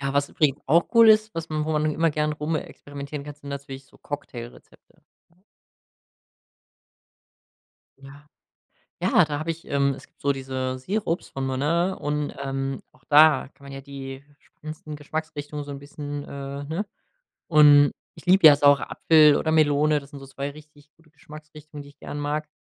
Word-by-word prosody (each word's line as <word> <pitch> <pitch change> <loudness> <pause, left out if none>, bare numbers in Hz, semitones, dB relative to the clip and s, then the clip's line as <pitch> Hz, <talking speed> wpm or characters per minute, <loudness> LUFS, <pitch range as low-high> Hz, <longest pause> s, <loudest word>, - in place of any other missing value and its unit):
Ja, 140 0 -2
was 140 0 +1
übrigens 145 -2 0
auch 165 +5 +3
cool 230 -1 +8
ist, 215 0 +4
was 165 0 -5
man 155 -1 -2
wo 160 - -2
man 150 0 0
immer 165 +1 +1
gerne 150 0 -1
rumexperimentieren 145 -2 -5
kann, 145 -1 -8
sind 145 -1 -13
natürlich 135 -1 -7
so - - -23
Cocktailrezepte, 120 -5 -10 0.3
ne? 185 - -34 2.6
Ja. 140 +2 -15 0.7
Ja, - - +4
da 145 -1 -4
habe 160 +2 -3
ich 165 - -13
ähm, 140 -1 +1
es - - -13
gibt - - -44
so 140 - +1
diese 130 -1 -4
Sirups 185 +3 -3
von 135 0 -4
Monin 165 +8 0
und, 150 0 -3
ähm, 135 -1 -3
auch - - -28
da 155 +1 +6
kann 140 - -20
man 140 - -10
ja 135 - -7
die 135 0 -9 0.2
spannendsten 155 0 -10
Geschmacksrichtungen 150 -1 -6
so 145 - -9
'n 140 - -6
bisschen 145 0 -7
äh, 140 0 -7
ne, 165 +8 -3 0.6
und 145 -2 +6 0.2
ich - - -15
liebe 185 -1 +6
ja 145 -2 +9
Saure-Apfel 145 +1 +4
oder 160 - -1
Melone, 150 -1 +3
das 140 0 -16
sind 145 - -10
so 135 - -11
2 140 +1 -5
richtig 150 0 -17
gute 165 -1 -26
Geschmacksrichtungen, 150 0 -12
die 140 - -14
ich 145 - -25
gerne 145 - -7
mag, 150 +1 -3
145 Hz, 170 wpm, -24 LUFS, 140-155 Hz, 2.6 s, ja